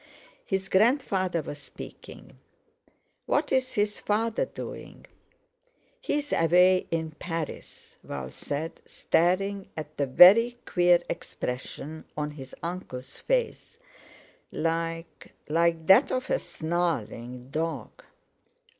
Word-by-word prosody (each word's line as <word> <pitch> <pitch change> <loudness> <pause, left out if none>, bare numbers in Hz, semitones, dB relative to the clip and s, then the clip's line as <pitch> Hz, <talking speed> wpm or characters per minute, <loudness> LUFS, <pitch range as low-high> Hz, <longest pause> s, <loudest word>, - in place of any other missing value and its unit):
His 195 0 -1
grandfather 190 - +2
was 145 +1 -7
speaking: - - -11 0.9
"What's 290 -1 +1 0.2
his 205 0 0
father 220 +2 0
doing?" - - -9 0.9
"He's 290 -9 -2
away 180 +3 +4
in 160 -1 -2
Paris," 165 -3 -6
Val 65 -2 -6
said, 150 - -5
staring 195 +3 +1
at 155 0 -7
the 140 - 0
very 220 - +8
queer 175 -1 +4
expression 150 +1 -5
on 150 0 -2
his 135 -3 -10
uncle's 140 -7 -6
face, 485 -2 -1 0.7
like—like 165 0 -2
that 230 - +6
of 255 0 -2
a - - +2
snarling 130 -7 -3
dog. 160 +2 -4
170 Hz, 95 wpm, -27 LUFS, 155-195 Hz, 0.9 s, very